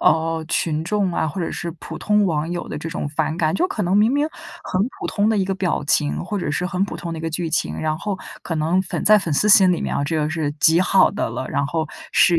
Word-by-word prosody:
呃， 160 0 +2
群 160 -2 0
众 195 0 0
啊， 160 - 0
或 155 +5 -4
者 165 - -2
是 175 - -4
普 - - -7
通 210 -1 +2
网 160 -3 0
友 175 0 -4
的 150 - -5
这 155 - -5
种 145 - -4
反 155 +1 -1
感。 160 - +1
就 355 - +2
可 385 - -3
能 180 +3 +1
明 220 +5 +4
明 290 +2 +1 0.3
很 185 - -2 0.2
普 - - -2
通 205 +1 +1
的 220 - +2
一 190 - +2
个 195 - -2
表 180 -5 -1
情， 150 -1 +1
或 205 +2 -3
者 160 - -2
是 180 - -1
很 185 +1 0
普 - - -6
通 170 -1 -5
的 165 - -5
一 160 - -8
个 165 - -1
剧 165 +1 -2
情， 155 - 0
然 155 0 -1
后 205 -2 -3 0.3
可 165 - -4
能 160 +4 +1
粉 175 - -4
在 215 +1 +7
粉 170 -6 -3
丝 210 - +2
心 190 -3 +7
里 170 - -1
面 - - -2
啊， 140 - 0
这 160 +3 -1
个 150 -1 0
是 160 -3 -1
极 165 +2 +5
好 185 +1 +4
的 - - -2
了， 125 +2 -5
然 140 - 0
后 160 +1 -2 0.3
是 175 -2 +5
170 Hz, 300 characters per minute, -21 LUFS, 155-195 Hz, 0.3 s, 在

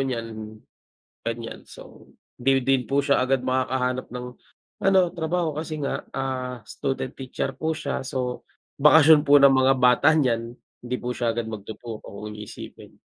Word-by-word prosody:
niyan, 115 -4 -4 0.7
ganiyan. 115 0 -5
So - - -14 0.3
di 135 +1 +2
din 135 -1 +1
po 140 +1 +1
siya 140 0 +3
agad 130 0 +1
makakahanap 130 0 -1
ng 125 0 -6 0.6
ano 195 0 +5
trabaho 165 0 -1
kasi 155 -1 -5
nga, 140 - -2
ah, 130 -2 -3
student 135 -1 -3
teacher 135 0 -3
po 160 +3 -2
siya, 140 -2 -3
so 125 -2 -4 0.3
bakasyon 150 +1 +7
po 145 - +7
ng 140 0 +7
mga 130 0 +4
bata 125 +4 +5
niyan, 120 -5 0 0.3
hindi 125 +1 -2
po 125 - -3
siya 120 -2 0
agad 120 -1 -2
magtuturo 110 +1 -7
kung 105 +2 -8
iisipin. 105 - -10
130 Hz, 150 wpm, -24 LUFS, 120-140 Hz, 0.7 s, bakasyon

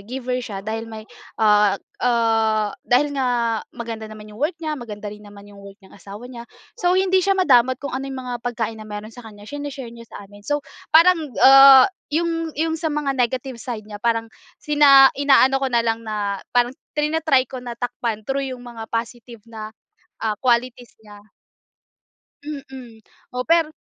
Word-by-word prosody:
giver 250 +2 -4
siya 200 -3 -6
dahil 225 +1 -4
may, 220 -1 -9 0.4
ah, 210 -2 +4 0.2
ah, 225 -3 +1
dahil 285 +4 +2
nga 260 -2 0 0.4
maganda 225 -2 -6
naman 215 0 -11
yung 210 - -13
work 315 +4 -1
niya, 310 -2 -3
maganda 210 -3 -7
rin 210 0 -13
naman 205 -1 -14
yung 200 - -14
work 200 0 -13
ng - - -18
asawa 205 +3 -11
niya, 235 -2 -9 0.3
so 360 -7 0
hindi 375 0 +3
siya 390 +1 +1
madamot 260 -8 +4
kung 280 - -6
ano 265 +1 -3
yung 270 - -6
mga 245 - -3
pagkain 225 -2 -4
na 215 - -9
meron 210 +1 -7
sa 245 - -13
kaniya, 205 -1 -14
sine-share 280 -1 -7
niya 230 -1 -13
sa 205 - -10
amin. 205 +1 -16
So 290 +3 -1 0.3
parang, 325 -3 +5
ah, 270 -1 +9 0.3
yung 330 0 -1
yung 320 +1 -1
sa 325 - -1
mga 295 -2 -1
negative 255 +1 -1
side 220 -3 -6
niya, 205 -1 -9
parang 230 0 0 0.3
sina 285 -2 +6
inaano 270 -1 +4
ko 270 - 0
na 240 -2 +2
lang 225 0 0
na 210 -3 -3
parang 245 0 +2 0.2
trina-try 300 -3 +2
ko 260 - -7
na 245 -1 -7
takpan 235 -3 -4
through 275 +2 -2
yung 250 - -9
mga 230 -2 -9
positive 235 0 -5
na, 220 -1 -8 0.6
ah, 215 -1 -1
qualities 245 -1 0
niya. 205 -1 -14 1.2
Mm. 265 -6 -9 0.3
O 250 0 -3
per 330 -1 +2
245 Hz, 180 wpm, -21 LUFS, 220-275 Hz, 1.2 s, ah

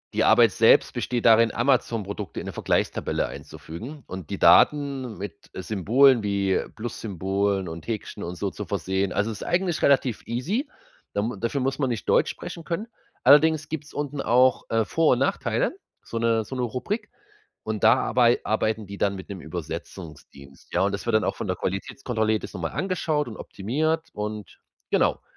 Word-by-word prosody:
die - - +3
Arbeit - - +6
selbst - - +4
besteht 120 -2 -2
darin, 115 -1 +6
Amazon-Produkte 115 -6 -1
in - - -8
'ne - - -5
Vergleichstabelle - - 0
einzufügen 120 - -9
und 95 -4 -8
die - - -3
Daten 140 -6 +4
mit 100 0 -8
Symbolen 115 +6 +3
wie 100 -2 +1
Plus-Symbolen 100 -3 -2
und 80 +1 -8
Häkchen 110 -3 -5
und 85 +1 -5
so 100 - -1
zu - - -6
versehen. 95 0 -1
Also, 105 +2 0
es 105 - -8
ist - - -6
eigentlich 175 -1 0
relativ 135 -5 +2
easy, 180 - -2 0.4
da - - -1
m 115 +2 -2
dafür 120 +5 -1
muss 135 +2 -1
man 135 -3 +1
nicht 115 -4 -4
Deutsch - - +4
sprechen 170 - -8
können. 180 +7 -3 0.4
Allerdings 150 +2 +5
gibt's 150 -1 -6
unten 145 -1 -3
auch, 125 +2 +3
äh, 115 -1 +1
Vor 165 +3 +3
und 125 - 0
Nachteile, 140 - 0 0.3
so 115 - -6
'ne 115 -1 +2
so 130 +5 -7
'ne 125 - -1
Rubrik, 200 - -3 0.5
und 110 -1 -3
da 115 - +8
arbei 120 -1 +3
arbeiten 110 0 0
die 100 +1 -8
dann 100 -1 +1
mit 95 - -9
'nem 95 -3 -6
Übersetzungsdienst. 80 -4 -9
Ja, 90 - +3
und 100 +1 +1
das 100 +4 -5
wird 115 - 0
dann 110 - +1
auch - - -1
von - - -4
der 95 - -1
Qualitätskontrolle 110 +3 -2
jedes 110 - -3
nochmal 85 -4 -4
angeschaut 165 -6 -1
und 110 - -8
optimiert 155 +11 -2
und 105 0 -6 0.3
genau. - - +2
115 Hz, 180 wpm, -25 LUFS, 100-135 Hz, 0.5 s, da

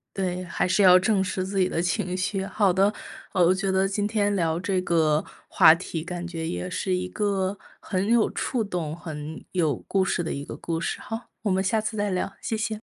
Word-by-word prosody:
对， 185 -1 -2
还 170 - -1
是 185 +3 +2
要 185 -2 +8
正 195 +1 +2
视 185 0 -2
自 195 0 -2
己 185 - +3
的 - - -2
情 180 +1 -1
绪。 190 +1 -1
好 195 -3 +2
的， 195 +2 +3 0.4
呃， 180 -3 +4
我 180 - +5
觉 195 0 -1
得 190 +1 +2
今 205 +1 -1
天 205 -1 +1
聊 165 -2 0
这 185 0 0
个 160 -4 +2 0.2
话 160 - +7
题， 170 -2 -5
感 175 0 -5
觉 165 -2 -4
也 180 - -3
是 185 +1 -1
一 185 0 -2
个 200 -1 -1 0.2
很 190 -1 -2
有 230 -1 +4
触 245 -4 -1
动、 170 -6 -3
很 155 -2 -7
有 160 -7 +1
故 195 -1 +2
事 175 -2 0
的 - - -3
一 140 - -4
个 - - -8
故 165 -1 -3
事。 - - -2
好， 225 +2 -7
我 205 - +1
们 190 +1 +1
下 205 +3 +1
次 215 0 -3
再 205 -1 0
聊， 185 +1 -2
谢 225 - -2
谢。 220 0 -2
185 Hz, 240 characters per minute, -25 LUFS, 175-200 Hz, 0.4 s, 要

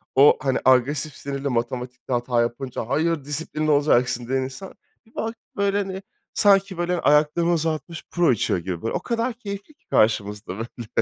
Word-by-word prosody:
o, 140 +2 +7
hani, 130 -1 +1
agresif, 135 +3 +3
sinirli, 140 0 -4
matematikte 125 +1 -3
hata 120 0 +1
yapınca 120 0 -3
"Hayır, 160 +1 0
disiplinli 155 +1 -2
olacaksın." 125 -4 +2
diyen 130 +1 +1
insan, 135 +9 -7 0.3
bir 225 - -26
baktım, 225 +1 -4
böyle, 200 0 +1
hani, 195 -1 -3 0.3
sanki, 195 -2 +3
böyle, 175 0 0
ayaklarını 150 +3 +3
uzatmış 160 0 -2
puro 175 -5 +3
içiyor 100 -5 +1
gibi 85 -1 -5
böyle. 115 - -2
O - - 0
kadar 235 +5 -1
keyifli 205 +3 -8
ki 325 +5 -42
karşımızda, 105 -2 +1
böyle. 115 0 -7
145 Hz, 165 wpm, -23 LUFS, 125-180 Hz, 0.3 s, o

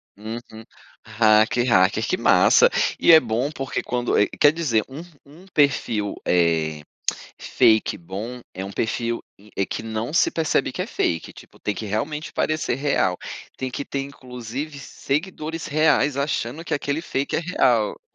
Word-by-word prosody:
Uhum, 110 +1 -8 0.4
hacker 110 +2 +3
hacker, 105 0 +3
que 185 - 0
massa. 485 - +5 0.3
E - - +6
é 160 - +10
bom, 125 +2 -2
porque 135 -3 -3
quando 120 -1 -2 0.3
quer 145 - +7
dizer, 145 -10 0
um 135 +4 -8 0.2
um 155 +6 -16
perfil, 125 - +1
eh, 80 -3 +1 0.6
fake 110 -1 +2
bom 105 +8 -7
é 95 - -5
um 100 - -6
perfil, 115 +3 -2 0.3
eh, 100 - +1
que - - -5
não 115 +4 -4
se - - +4
percebe 160 -2 0
que - - -4
é - - -5
fake, 80 - -2
tipo, - - -16
tem 105 - -2
que 110 - -6
realmente 150 +10 -3
parecer 155 -5 -1
real, 135 -10 +1 0.4
tem 130 -1 -4
que 140 - -4
ter 140 - -3
inclusive 135 +1 -7
seguidores 155 +3 -4
reais 150 -2 +2
achando 140 +1 -2
que - - -4
aquele 145 +2 -2
fake 140 -4 -2
é - - +1
real. 125 -11 +1
125 Hz, 155 wpm, -23 LUFS, 110-150 Hz, 0.6 s, é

